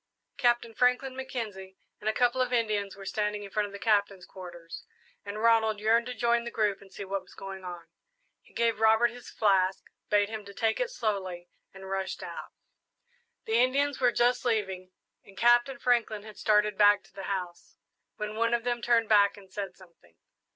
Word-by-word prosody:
Captain 240 -1 +2
Franklin, 250 +2 +1
Mackenzie, 215 -8 -6 0.2
and 215 - -1
a - - 0
couple 245 +2 +2
of 250 -1 0
Indians 215 -4 0
were 195 0 -11
standing 210 +1 -2
in 200 - -9
front 210 0 0
of - - -12
the 200 - -7
Captain's 200 -3 +1
quarters, 175 -3 -10 0.4
and 200 +1 -6
Ronald 220 -2 +3
yearned 230 +3 +2
to 250 - -5
join 235 0 +2
the 235 - -5
group 210 -4 0
and 195 -1 -16
see 200 - -7
what 195 0 -2
was - - -18
going 195 -1 -8
on. 175 -2 -7 0.6
He - - -24
gave 230 -2 0
Robert 220 +2 +4
his 245 0 -11
flask, 190 -3 +2 0.3
bade 205 -1 +3
him 215 0 -6
take 210 +2 -1
it - - 0
slowly, 190 - -3 0.2
and 190 0 -11
rushed 195 0 -3
out. - - -7 1.0
The 225 +1 +2
Indians 280 +3 +1
were 245 -1 +4
just 245 +1 +2
leaving, 190 -6 -1 0.3
and 195 - -18
Captain 240 +2 +4
Franklin 235 -4 +1
had 215 -1 -12
started 210 -1 +2
back 205 0 +6
to - - -23
the 195 - -7
house, 180 -3 -5 0.4
when 210 0 -5
one 230 +1 +2
of 235 - -3
them 240 -1 -1
turned 235 -2 +3
back 205 -1 +4
and 190 -2 -16
said 195 -3 -5
something. 170 - -20
210 Hz, 190 wpm, -29 LUFS, 195-235 Hz, 1.0 s, back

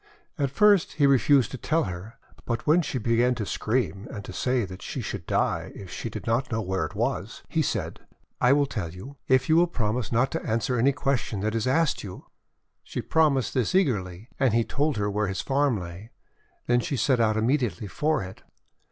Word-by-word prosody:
At 140 -1 +1
first 200 -1 +4
he 145 -1 +2
refused 140 -2 +4
to 130 - -6
tell 165 +1 +1
her, 90 +4 -7 0.3
but 115 -1 -2
when 160 +4 +5
she 145 - -3
began 120 +2 +2
to 110 -3 -3
scream, 110 -1 -1
and 105 -6 -7
to - - -8
say 125 +2 0
that 95 0 -10
she - - -5
should - - -5
die - - 0
if 95 -3 -9
she - - -5
did - - -7
not 120 +3 0
know 115 - 0
where 95 -3 -1
it - - -8
was, - - -2
he - - 0
said: - - -2 0.2
— - - -42
'I 125 +2 +5
will 145 0 +3
tell 105 -11 -4
you, 95 +12 -10
if 130 0 +3
you 160 - +4
will 175 +1 +5
promise 115 - -2
not 125 +3 +2
to - - -2
an 110 - 0
swer 125 +1 -1
any 135 +4 +4
question 135 -7 -1
that 110 +1 -1
is 115 +1 -1
asked 160 +3 +1
you." 95 -3 -9 0.6
She - - -6
promised 145 -7 +2
this 125 - 0
eagerly, 105 - 0
and 130 -5 +3
he 115 - +3
told 145 +2 -1
her 105 0 0
where 105 +1 0
his 95 -1 -2
farm 135 -4 +1
lay. 90 +5 -9 0.6
Then 120 0 +3
she 135 +3 -2
set 125 +2 +2
out 110 -1 +2
immediately 115 - 0
for 150 +8 0
it. 90 0 -10
120 Hz, 215 wpm, -26 LUFS, 105-140 Hz, 0.6 s, when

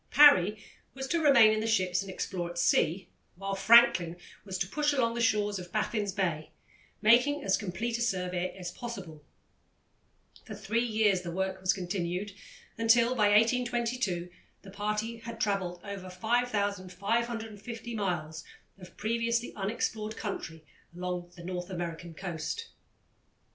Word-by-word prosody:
Parry 215 -8 +7 0.4
was 265 0 -4
to 335 +2 +1
remain 270 -8 +7
in 215 - 0
the 220 - -2
ships 185 -4 +1
and 195 - -8
explore 180 -2 -4
at 175 - -9
sea, 175 +1 +2 0.3
while 195 +2 -4
Franklin 195 -5 +5 0.3
was 190 -2 -5
to 175 - -1
push 295 +7 0
along 235 -4 +1
the 235 - -2
shores 210 -3 +1
of 180 -1 -10
Baffin's 210 -1 -1
Bay, 170 -6 -2 0.5
making 250 +7 +4
as 195 - +3
complete 220 +4 -3
a - - -3
survey 180 -4 -1
as 180 -2 -5
possible. 175 -10 -8 1.2
For 215 - -8
three 215 +3 -1
years 215 -5 +2
the 175 - -6
work 190 +2 -2
was 185 0 +3
continued, 180 +1 -3 0.5
until, 230 +2 +4
by 210 -5 +3
1822, 230 -4 +1 0.3
the 195 - -11
party 210 +3 -2
had 230 0 -8
travelled 195 -5 -1
over 200 -2 -7
5550 220 +2 -2
miles 175 -7 -3 0.4
of 180 -2 -14
previously 230 +2 -1
unexplored 215 +1 -3
country 160 -6 -5 0.3
along 180 -1 -4
the 170 - -11
North 180 0 -5
American 170 -2 -5
coast. 190 - -5
205 Hz, 140 wpm, -30 LUFS, 180-230 Hz, 1.2 s, Parry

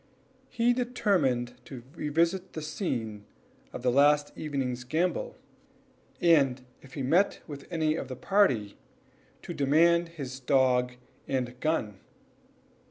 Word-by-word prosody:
He 240 0 +2
determined 175 - 0
to 125 -4 -9
revisit 170 +4 0
the 155 - -5
scene 115 - -3 0.5
of - - -8
the 125 - +3
last 145 +2 +3
evening's 130 -5 -3
gambol, 180 - -1 0.8
and 135 -7 +3 0.2
if 130 -1 -14
he 140 - -3
met 175 +10 +2
with 145 -3 -9
any 155 -3 0
of 135 - -5
the 130 - -6
party, 125 - +1 0.6
to - - -6
demand 170 +4 +3
his 135 -6 -7
dog 125 -1 +2 0.3
and 125 -2 -2
gun. 115 -11 -1
145 Hz, 120 wpm, -28 LUFS, 125-170 Hz, 0.8 s, the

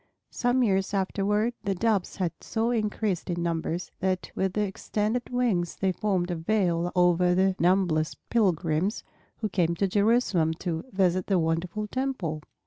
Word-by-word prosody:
Some 250 +1 +1
years 195 -2 +1
afterward 205 +4 0
the 195 -2 -1
Doves 210 -1 0
had 180 -4 -1
so 225 +1 -1
increased 210 -5 -1
in 175 -1 -1
numbers 170 +1 -2
that 185 -2 -1
with 190 -1 -1
their 210 +1 +1
extended 210 +4 -2
wings 225 -9 0
they 190 -1 0
formed 185 -2 -1
a - - -1
veil 175 -1 0
over 180 0 +4
the 190 0 +3
numberless 175 -3 +2 0.2
pilgrims 185 -3 +1 0.4
who 215 - +1
came 170 -3 +1
to 195 +3 +1
Jerusalem 200 -5 +2
to 165 -1 -4
visit 185 -2 +1
the 195 - +3
wonderful 170 +5 -1
Temple. 210 - -3
190 Hz, 150 wpm, -27 LUFS, 175-210 Hz, 0.4 s, over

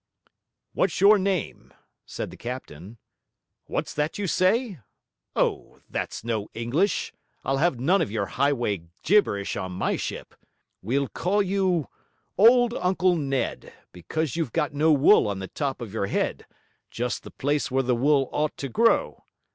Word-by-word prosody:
'What's - - 0
your 205 +1 +7
name?' 190 -3 -3 0.3
said - - -5
the - - -10
captain. 115 - -8 0.7
'What's - - -3
that 150 +2 -2
you 205 - -2
say? 190 - +1 0.6
Oh, - - -1
that's - - -4
no 110 -3 -2
English; 130 - 0 0.3
I'll 135 - 0
have 150 -4 +1
none 180 +10 +3
of - - -1
your 105 -1 -1
highway 120 - 0 0.2
gibberish 150 - +2
on 95 -1 -4
my 90 - -1
ship. - - -6 0.5
We'll 135 +7 0
call 200 +8 0
you 185 -5 0 0.5
old 240 +3 +6
Uncle 185 -2 +1
Ned, 135 -4 -2 0.2
because 155 - -3
you've 165 -8 -2
got 150 -3 0
no 155 +3 +3
wool 145 - +5
on 100 -1 -2
the 95 0 -5
top 140 -4 -3
of 110 -4 -7
your 100 -3 -1
head, - - -2 0.4
just 120 +1 -3
the - - -11
place 145 +1 -1
where 135 +1 +1
the 125 0 +1
wool 135 +2 +3
ought 150 0 -1
to 135 - -4
grow. 230 - +2
145 Hz, 155 wpm, -25 LUFS, 120-185 Hz, 0.7 s, your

